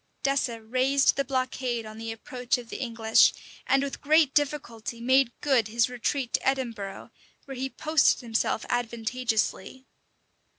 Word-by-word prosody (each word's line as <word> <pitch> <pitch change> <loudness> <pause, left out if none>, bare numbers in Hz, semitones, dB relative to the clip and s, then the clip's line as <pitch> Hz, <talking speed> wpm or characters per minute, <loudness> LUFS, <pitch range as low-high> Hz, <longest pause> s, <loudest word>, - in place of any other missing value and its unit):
[] - - -44
Dessé 275 -4 0
raised 255 +5 +2
the 275 - 0
blockade 255 -3 -2
on 215 0 -10
the 225 0 -4
approach 250 +2 -2
of 240 -2 -10
the - - -6
English; 225 -3 +4 0.3
and 270 +1 +3
with 280 - -5
great 305 -1 +4
difficulty 245 -6 -2
made 260 +1 +3
good 260 -7 +2
his 230 +2 +1
retreat 250 +1 -2
to - - 0
Edinburgh, 235 -7 -3 0.3
where 275 - -8
he 265 +1 -3
posted 310 +1 +2
himself 225 -2 -1
advantageously. 240 0 -2
250 Hz, 145 wpm, -27 LUFS, 230-270 Hz, 0.3 s, English